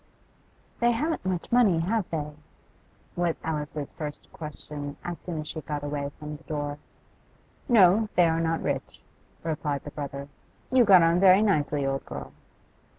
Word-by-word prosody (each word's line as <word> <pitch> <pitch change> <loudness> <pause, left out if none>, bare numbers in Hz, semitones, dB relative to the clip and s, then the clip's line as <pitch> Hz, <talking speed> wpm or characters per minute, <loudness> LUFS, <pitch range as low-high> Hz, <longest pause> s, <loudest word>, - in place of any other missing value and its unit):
'They 235 - +4
haven't 310 +8 -1
much 185 +1 -2
money, 235 -8 +5
have 195 +4 0
they?' 150 -2 -3 0.8
was 175 -2 0
Alice's 150 -2 -3
first 150 -2 -7
question 150 -2 -7
as 175 -1 -5
soon 165 -4 -4
as 155 - -9
she 155 - -5
got 150 -1 -4
away 145 -1 -2
from 150 0 -7
the 155 - -22
door. 145 -1 -3 0.9
'No, 210 -1 +6
they 175 - +6
are 165 0 +1
not 165 0 0
rich,' - - -3 0.4
replied 150 -3 -2
the 145 - -8
brother. 140 -1 -6 0.4
'You 255 -2 +6
got 185 -4 +8
on 165 +1 +4
very 190 +2 +7
nicely, 150 -8 +1
old 135 0 -1
girl. 70 -1 -7
160 Hz, 155 wpm, -27 LUFS, 145-185 Hz, 0.9 s, got